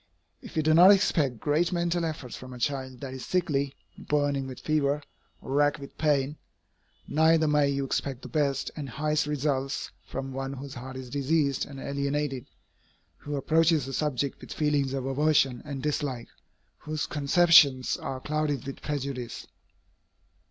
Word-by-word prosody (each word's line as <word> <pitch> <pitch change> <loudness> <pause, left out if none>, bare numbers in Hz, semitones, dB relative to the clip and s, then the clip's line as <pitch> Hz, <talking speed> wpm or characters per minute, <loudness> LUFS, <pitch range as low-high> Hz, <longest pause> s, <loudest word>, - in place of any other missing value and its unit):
If - - -10
you 155 - +2
do 155 +1 +4
not 175 +4 +9
expect 155 - +3
great 155 +6 +1
mental 175 -1 0
efforts 150 -6 -5
from 130 0 -9
a - - -8
child 130 0 -3
that 135 -2 -6
is 130 - -7
sickly, 140 -6 0 0.2
burning 145 -2 0
with 130 -1 -8
fever, 150 -1 +1 0.4
or - - -8
racked 145 +1 +3
with 140 -2 -11
pain, 145 -1 +1 0.7
neither 160 +1 +4
may 150 -1 +3
you 140 0 -1
expect 135 -1 -3
the - - -6
best 140 -4 0
and 145 -3 -5
highest 150 +3 0
results 140 -2 -1
from 135 0 -6
one 135 +1 -4
whose 140 0 -7
heart 130 +2 -8
is 130 -1 -8
diseased 140 -1 +1
and 135 -1 -9
alienated, 140 -1 -2 0.7
who 145 0 -5
approaches 155 0 +2
a 135 - -6
subject 140 -2 -1
with - - -11
feelings 145 -3 +1
of 130 -1 -3
aversion 135 -2 +2
and 140 -3 -5
dislike, 140 -5 -2 0.5
whose 155 -1 -3
conceptions 150 -3 +5
are 130 - -5
clouded 150 0 -1
with 135 - -7
prejudice. 135 -4 -4
140 Hz, 160 wpm, -28 LUFS, 135-150 Hz, 0.7 s, not